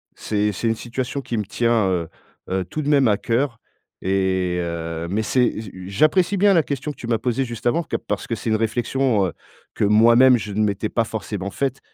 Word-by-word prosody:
c'est 105 0 -1
c'est 105 +4 -3
une 115 - +2
situation 125 +4 -4
qui 120 -3 -4
me 105 - 0
tient, 115 -1 +1
heu, 85 -3 -1 0.4
heu, 95 0 0
tout 155 - -4
de 145 - -2
même 140 -4 +4
à 105 - +3
cœur 115 +1 -1 0.4
et 95 -2 0
heu, 85 -1 -4
mais 105 +4 0
c'est 125 +1 +1
j 110 -4 -8 0.2
j'apprécie 170 - +2
bien 200 +1 +5
la 165 -4 +4
question 140 +1 -3
que - - -13
tu 120 - -7
m'as 115 -1 +2
posée 125 +3 -1
juste 120 -2 -8
avant 160 +8 +2
ca - - 0
parce - - -2
que 115 - -1
c'est 115 - -4
une 110 - +3
réflexion, 115 0 +1
heu, 85 - -6 0.4
que - - -2
moi 110 +3 +5
même 125 0 +7
je 105 -2 -6
ne 110 +2 +1
m'étais 105 +1 -1
pas 115 - +1
forcément 105 -3 -5
faite. 135 +2 -2
115 Hz, 225 wpm, -22 LUFS, 100-130 Hz, 0.4 s, même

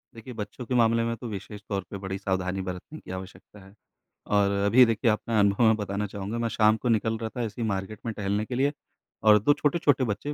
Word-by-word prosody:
देखिए, 115 +2 -9
बच्चों 110 +3 -6
के 125 - -2
मामले 115 -1 +3
में 115 0 -1
तो 120 - -7
विशेष 105 0 -7
तौर 100 -2 -1
पे 100 - -6
बड़ी 95 0 -4
सावधानी 95 -1 -2
बरतने 95 - -7
की - - -11
आवश्यकता 95 +2 -9
है। 95 - -17 0.5
और 100 -1 +3
अभी 120 +5 +7
देखिए 115 0 +2
अपना 110 +1 0
अनुभव 100 +3 +3
मैं 110 - +5
बताना 105 0 -3
चाहूँगा, 100 +3 -5
मैं 115 -1 -1
शाम 110 +1 +3
को 120 - -2
निकल 110 0 +1
रहा 110 -1 -4
था 120 - -1
ऐसे 110 +1 -5
ही 110 - 0
मार्केट 100 +1 -3
में 115 - -2
टहलने 105 0 -1
के 125 - -5
लिए 140 +3 +1 0.5
और 105 -1 +7
2 145 +8 +4
छोटे-छोटे 145 -3 +2
बच्चे 115 +6 -3
110 Hz, 230 wpm, -27 LUFS, 100-115 Hz, 0.5 s, अभी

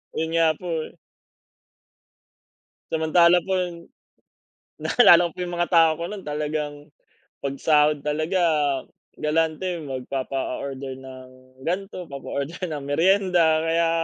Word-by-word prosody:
Ayun 160 0 -1
nga 165 -1 +4
po. 180 - -8 2.2
Samantalang 170 +2 +4
po 190 - -1
yung 175 -2 -2 0.9
naalala 175 -8 +6
ko 170 - -5
po 180 - -9
yung 175 -1 -4
mga 175 - +1
tao 165 -1 +6
ko 170 - -3
no'n 205 +1 -7
talagang, 150 -1 -3 0.6
'pag 140 0 -4
sahod 150 -1 +3
talaga, 155 +5 -1 0.7
galante. 160 +3 -1
Magpapa-order 135 -1 -4
ng 130 -1 -11 0.3
gan'to, 180 +2 -4
papa-order 140 +5 -5
ng 155 -4 -5
meryenda, 170 +2 +3
kaya 165 +1 +1
160 Hz, 110 wpm, -24 LUFS, 145-175 Hz, 2.2 s, naalala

